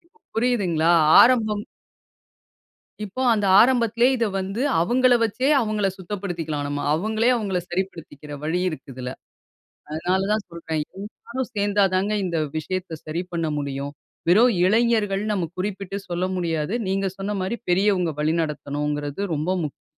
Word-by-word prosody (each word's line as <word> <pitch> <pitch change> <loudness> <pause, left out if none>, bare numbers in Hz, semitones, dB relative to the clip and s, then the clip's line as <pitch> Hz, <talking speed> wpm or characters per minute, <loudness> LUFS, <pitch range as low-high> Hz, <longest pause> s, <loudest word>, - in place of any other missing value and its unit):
இப்ப - - -28 0.2
புரியுதுங்களா? 190 -9 +2 0.3
ஆரம்பம் 215 -4 +3 1.4
இப்போ, 210 +5 -5
அந்த 205 -2 0 0.2
ஆரம்பத்திலயே 235 -1 +3
இதை 230 -2 +1
வந்து, 195 +5 -3 0.2
அவங்கள 245 +7 +3
வச்சே, 240 +4 0
அவங்கள 215 -3 0
சுத்தப்படுத்திக்கலாம் 175 -6 -4
நம்ம. 145 0 -3
அவங்களே, 220 +7 +1
அவங்கள 195 -5 -1
சரிப்படுத்திக்கிற 165 -5 -5
வழி 160 +3 0
இருக்கு 155 -6 -6
இதில. 125 0 -6 0.8
அதனால 180 +5 0
தான் 215 -1 0
சொல்றேன், 160 -2 -3 0.2
எல்லாரும் 235 +5 -6
சேந்தா 205 0 +2
தாங்க 195 +3 +1
இந்த 175 -3 -1 0.2
விஷயத்தை 180 +2 -4
சரி 155 +3 -3
பண்ண 165 -1 -1
முடியும். 140 0 -4 0.4
வெறும் 230 +7 +6
இளைஞர்கள், 215 -1 +2
நம்ம 195 -4 0
குறிப்பிட்டு 195 0 -4
சொல்ல 175 +1 -1
முடியாது. 165 -1 -1
நீங்க 195 +1 0
சொன்ன 200 +2 -3
மாரி 190 +5 -2
பெரியவங்க 180 -2 +2
வழிநடத்தணுங்கிறது, 150 -1 -2
ரொம்ப 155 +3 -2
முக்கியம். 150 - -7
190 Hz, 130 wpm, -23 LUFS, 160-210 Hz, 1.4 s, வெறும்